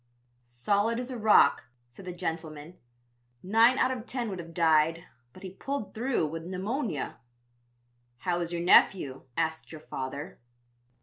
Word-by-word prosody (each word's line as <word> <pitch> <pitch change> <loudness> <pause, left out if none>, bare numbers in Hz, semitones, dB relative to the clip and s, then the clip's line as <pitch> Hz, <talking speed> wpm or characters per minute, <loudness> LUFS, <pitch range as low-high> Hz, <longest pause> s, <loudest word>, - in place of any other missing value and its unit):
"'Solid 200 - 0
as 250 +1 -5
a - - -4
rock,' 210 -9 +5 0.2
said 125 +11 -14
the 180 - -5
gentleman; 160 -1 -6 0.7
'nine 225 +6 +4
out 260 - +2
of 250 -2 -5
ten 245 -3 -2
would 190 -3 -5
have 165 -1 -8
died, 165 0 +2 0.3
but 185 - -15
he 190 - -7
pulled 270 +3 -5
through 240 -5 0
with 165 +2 -5
pneumonia.' 190 - -3 1.0
"'How 175 +6 -1
is 170 -1 -3
your 170 0 -3
nephew?' 160 -7 +4
asked 160 -1 -2
your 155 -2 -9
father. 135 +2 -6
175 Hz, 145 wpm, -28 LUFS, 160-220 Hz, 1.0 s, rock